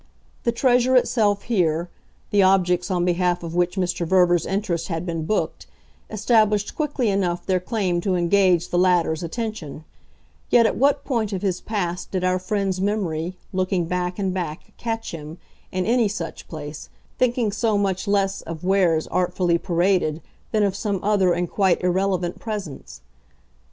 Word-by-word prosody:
The 235 Hz, -, +3 dB
treasure 250 Hz, +1 st, +3 dB
itself 210 Hz, -5 st, +2 dB
here, 170 Hz, -7 st, +1 dB, 0.4 s
the 205 Hz, -, +4 dB
objects 180 Hz, -1 st, +3 dB
on 175 Hz, -2 st, +1 dB
behalf 180 Hz, 0 st, +1 dB
of 165 Hz, -1 st, -5 dB
which 175 Hz, +1 st, +1 dB
Mr. 180 Hz, -2 st, -1 dB
Verver's 175 Hz, -1 st, +3 dB
interest 190 Hz, -4 st, -1 dB
had 165 Hz, -1 st, -3 dB
been 165 Hz, -3 st, -3 dB
booked, 215 Hz, -, -2 dB, 0.4 s
established 215 Hz, -1 st, +2 dB
quickly 290 Hz, -6 st, 0 dB
enough 185 Hz, -3 st, -1 dB
their 185 Hz, -1 st, +1 dB
claim 180 Hz, -3 st, -1 dB
to 185 Hz, 0 st, 0 dB
engage 180 Hz, 0 st, +3 dB
the 175 Hz, -, +1 dB
latter's 175 Hz, -3 st, +2 dB
attention; 175 Hz, -, -5 dB, 0.7 s
yet 235 Hz, -1 st, +5 dB
at -, -, +1 dB
what 280 Hz, +3 st, +2 dB
point 225 Hz, -6 st, -1 dB
of 190 Hz, -, -3 dB
his 185 Hz, -3 st, -1 dB
past 180 Hz, -5 st, -3 dB
did 185 Hz, -1 st, -2 dB
our 185 Hz, 0 st, +2 dB
friend's 190 Hz, 0 st, -1 dB
memory, 185 Hz, -4 st, -1 dB, 0.2 s
looking 185 Hz, -1 st, 0 dB
back 180 Hz, +1 st, -2 dB
and 190 Hz, -3 st, -1 dB
back, 170 Hz, -4 st, -5 dB
catch 225 Hz, -1 st, -4 dB
him, 155 Hz, 0 st, -8 dB, 0.3 s
in 185 Hz, 0 st, -1 dB
any 235 Hz, 0 st, +3 dB
such 170 Hz, -6 st, -6 dB
place, 150 Hz, -2 st, -8 dB, 0.3 s
thinking 240 Hz, -3 st, +1 dB
so 215 Hz, 0 st, +1 dB
much 195 Hz, 0 st, -1 dB
less 195 Hz, -1 st, +1 dB
of 165 Hz, 0 st, -8 dB
wares 180 Hz, -4 st, +2 dB
artfully 180 Hz, -1 st, +1 dB
paraded 170 Hz, -3 st, +1 dB, 0.3 s
than 215 Hz, -2 st, +2 dB
of 195 Hz, -2 st, +1 dB
some 200 Hz, -2 st, -2 dB
other 200 Hz, -3 st, +3 dB
and 175 Hz, +1 st, 0 dB
quite 190 Hz, -3 st, +2 dB
irrelevant 180 Hz, -1 st, 0 dB
presence? 205 Hz, -10 st, -6 dB
185 Hz, 160 wpm, -23 LUFS, 175-205 Hz, 0.7 s, yet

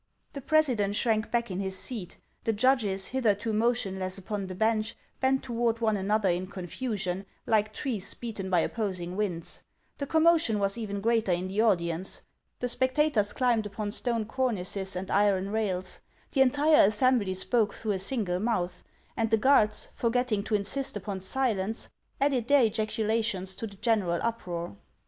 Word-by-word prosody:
The 280 Hz, -, -6 dB
president 250 Hz, -9 st, +2 dB
shrank 220 Hz, 0 st, +1 dB
back 235 Hz, -3 st, -1 dB
in 185 Hz, -, -3 dB
his 190 Hz, -1 st, 0 dB
seat; 205 Hz, -5 st, -3 dB, 0.3 s
the 225 Hz, -, +1 dB
judges, 210 Hz, -5 st, +2 dB
hitherto 225 Hz, -4 st, 0 dB
motionless 200 Hz, -5 st, 0 dB
upon 195 Hz, 0 st, -4 dB
the 185 Hz, -, -6 dB
bench, 220 Hz, +2 st, 0 dB, 0.2 s
bent 265 Hz, 0 st, +2 dB
toward 235 Hz, -2 st, 0 dB
one 220 Hz, -2 st, +2 dB
an 195 Hz, 0 st, -3 dB
other 215 Hz, -1 st, +2 dB
in 180 Hz, +1 st, -1 dB
confusion, 190 Hz, 0 st, -3 dB, 0.2 s
like 215 Hz, -1 st, +2 dB
trees 215 Hz, -5 st, -2 dB
beaten 210 Hz, -5 st, -5 dB
by 180 Hz, -3 st, +3 dB
opposing 185 Hz, -5 st, -3 dB
winds. 185 Hz, -5 st, -2 dB, 0.4 s
The 280 Hz, -, -3 dB
commotion 320 Hz, -8 st, +4 dB
was 200 Hz, -1 st, +1 dB
even 205 Hz, -4 st, -4 dB
greater 225 Hz, -2 st, +2 dB
in 180 Hz, +2 st, -1 dB
the 200 Hz, +3 st, +1 dB
audience. 175 Hz, -4 st, 0 dB, 0.3 s
The -, -, -3 dB
spectacors 255 Hz, -3 st, +1 dB
climbed 235 Hz, -4 st, +2 dB
upon 205 Hz, 0 st, -4 dB
stone 230 Hz, 0 st, 0 dB
cornices 200 Hz, -6 st, -1 dB
and 185 Hz, +1 st, -4 dB
iron 200 Hz, -1 st, +2 dB
rails; 195 Hz, -4 st, -1 dB, 0.3 s
the 270 Hz, -, +2 dB
entire 290 Hz, 0 st, +5 dB
assembly 215 Hz, -3 st, +2 dB
spoke 210 Hz, +2 st, +1 dB
through 220 Hz, -, -2 dB
a 195 Hz, -, -1 dB
single 190 Hz, -4 st, -1 dB
mouth; 185 Hz, -5 st, -1 dB, 0.3 s
and 225 Hz, -1 st, 0 dB
the 225 Hz, -, +4 dB
guards, 215 Hz, -3 st, +3 dB
forgetting 235 Hz, -2 st, 0 dB
to 220 Hz, -, 0 dB
insist 210 Hz, +4 st, 0 dB
upon 200 Hz, -1 st, -5 dB
silence, 220 Hz, 0 st, -1 dB, 0.3 s
added 270 Hz, -4 st, +1 dB
their 285 Hz, -2 st, +5 dB
ejaculations 215 Hz, -3 st, -1 dB
to 225 Hz, -, -4 dB
the 200 Hz, -, -12 dB
general 200 Hz, -6 st, +1 dB
uproar. 175 Hz, -, -3 dB
215 Hz, 160 wpm, -28 LUFS, 190-235 Hz, 0.4 s, entire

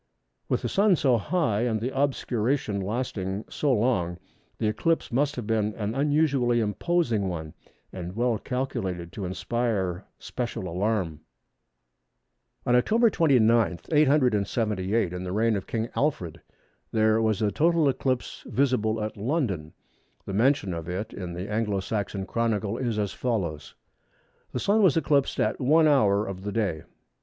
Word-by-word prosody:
With -, -, 0 dB
the -, -, 0 dB
Sun 200 Hz, -1 st, +3 dB
so 130 Hz, -7 st, +2 dB
high 115 Hz, -, 0 dB
and 115 Hz, -2 st, 0 dB
the 125 Hz, +5 st, -3 dB
obscuration 130 Hz, -5 st, 0 dB
lasting 100 Hz, -2 st, -3 dB
so 145 Hz, -, 0 dB
long, 105 Hz, -8 st, +1 dB, 0.4 s
this 110 Hz, -2 st, +1 dB
eclipse 165 Hz, +10 st, 0 dB
must 140 Hz, +4 st, +1 dB
have 120 Hz, -, -5 dB
been 110 Hz, -1 st, 0 dB
an 105 Hz, 0 st, -3 dB
unusually 140 Hz, -3 st, +2 dB
imposing 115 Hz, -, 0 dB
one, 80 Hz, -3 st, -5 dB, 0.4 s
and 90 Hz, 0 st, -6 dB
well 120 Hz, -1 st, +1 dB
calculated 110 Hz, -10 st, -3 dB
to 100 Hz, -, -5 dB
inspire 95 Hz, 0 st, -2 dB
special 120 Hz, -6 st, -4 dB
alarm. 90 Hz, -3 st, -1 dB, 1.5 s
On 120 Hz, -, +2 dB
Oct. 225 Hz, -, +4 dB
29, 115 Hz, -, +3 dB
878, 110 Hz, -, +2 dB
in 90 Hz, 0 st, -4 dB
the 90 Hz, -, -4 dB
reign 110 Hz, +3 st, +2 dB
of 100 Hz, -, -4 dB
King 115 Hz, 0 st, -2 dB
Alfred, 90 Hz, -, -1 dB, 0.5 s
there 110 Hz, 0 st, +3 dB
was 110 Hz, -1 st, +1 dB
a 105 Hz, -, +2 dB
total 165 Hz, +2 st, +3 dB
eclipse 130 Hz, -2 st, -1 dB
visible 115 Hz, -5 st, +1 dB
at 105 Hz, 0 st, -5 dB
London. 105 Hz, -, -1 dB, 0.5 s
The 95 Hz, -, -5 dB
mention 120 Hz, -2 st, +2 dB
of 85 Hz, 0 st, -5 dB
it 100 Hz, +5 st, -4 dB
in 90 Hz, -3 st, -6 dB
the 90 Hz, +3 st, -5 dB
Anglo 105 Hz, -2 st, -1 dB
Saxon 100 Hz, 0 st, -3 dB
Chronicle 110 Hz, -2 st, -1 dB
is 120 Hz, -4 st, -1 dB
as 100 Hz, -2 st, -1 dB
follows:—"The 85 Hz, -, -6 dB
Sun 210 Hz, +2 st, +2 dB
was 180 Hz, -6 st, +4 dB
eclipsed 145 Hz, -3 st, +1 dB
at -, -, 0 dB
1 155 Hz, +5 st, +5 dB
hour 105 Hz, -8 st, +3 dB
of 95 Hz, -1 st, -6 dB
the 105 Hz, +1 st, -4 dB
day." 100 Hz, -8 st, -1 dB
110 Hz, 145 wpm, -26 LUFS, 95-130 Hz, 1.5 s, 1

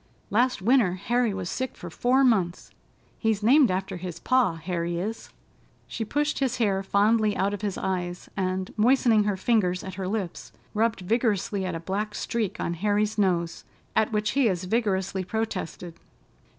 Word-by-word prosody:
Last 240 Hz, -2 st, +2 dB
winter 230 Hz, -5 st, +4 dB
Harry 235 Hz, +4 st, +1 dB
was 190 Hz, -2 st, -4 dB
sick 260 Hz, +6 st, -3 dB
for 175 Hz, -, -8 dB
four 255 Hz, +9 st, +2 dB
months—he's 215 Hz, 0 st, -1 dB
named 265 Hz, +4 st, +6 dB
after 185 Hz, 0 st, -2 dB
his 175 Hz, -1 st, -6 dB
pa, 255 Hz, -7 st, +2 dB
Harry 170 Hz, +1 st, -3 dB
is." 215 Hz, +6 st, -4 dB, 0.6 s
She 230 Hz, -, -4 dB
pushed 295 Hz, +7 st, -1 dB
his 255 Hz, -2 st, 0 dB
hair 200 Hz, -5 st, +1 dB
fondly 210 Hz, +2 st, +2 dB
out 200 Hz, +1 st, +1 dB
of 205 Hz, -, -5 dB
his 205 Hz, -3 st, -2 dB
eyes, 180 Hz, -2 st, -3 dB
and, 185 Hz, -1 st, -2 dB
moistening 225 Hz, -2 st, +4 dB
her 205 Hz, -2 st, 0 dB
fingers 185 Hz, -4 st, +1 dB
at 190 Hz, -, -6 dB
her 185 Hz, -, -2 dB
lips, 195 Hz, -3 st, -4 dB, 0.2 s
rubbed 225 Hz, -1 st, +1 dB
vigorously 205 Hz, -2 st, 0 dB
at 180 Hz, -, -3 dB
a -, -, -3 dB
black 205 Hz, +5 st, -3 dB
streak 225 Hz, -5 st, -2 dB
on 170 Hz, -, -1 dB
Harry's 210 Hz, +4 st, 0 dB
nose, 175 Hz, -4 st, 0 dB, 0.3 s
at 220 Hz, 0 st, +2 dB
which 210 Hz, -1 st, 0 dB
he 270 Hz, -3 st, +3 dB
as 180 Hz, -2 st, -2 dB
vigorously 190 Hz, -2 st, 0 dB
protested. 185 Hz, -5 st, -4 dB
205 Hz, 165 wpm, -26 LUFS, 185-225 Hz, 0.6 s, named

